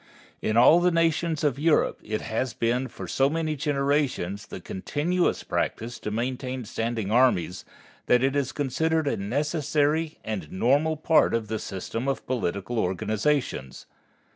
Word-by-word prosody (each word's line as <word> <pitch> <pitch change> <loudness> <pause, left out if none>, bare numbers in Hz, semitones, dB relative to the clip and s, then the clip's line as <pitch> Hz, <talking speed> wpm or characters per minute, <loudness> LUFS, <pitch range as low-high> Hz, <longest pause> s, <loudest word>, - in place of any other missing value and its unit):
In 110 - 0
all 140 +8 +7
the 180 +1 +3
nations 165 -2 +1
of 140 -3 +1
Europe 160 +1 +2
it 110 0 -3
has 120 +2 -2
been 125 +3 0
for - - -8
so 135 +1 +2
many 155 0 -1
generations 140 - -1
the - - -7
continuous 150 - -1
practice 115 +2 -2
to - - -4
maintain 125 +2 -3
standing 115 -2 -2
armies, 100 -8 +2 0.4
that 125 +1 +4
it 135 +1 +1
is 135 -2 0
considered 155 +3 0
a - - +1
necessary 150 +6 0
and 95 -9 -5
normal 145 +10 +2
part 155 -4 +3
of 110 -2 -2
the 110 -1 -2
system 115 +6 -4
of 135 - -2
political 115 -1 -2
organizations. 110 - -1
130 Hz, 145 wpm, -26 LUFS, 110-150 Hz, 0.4 s, all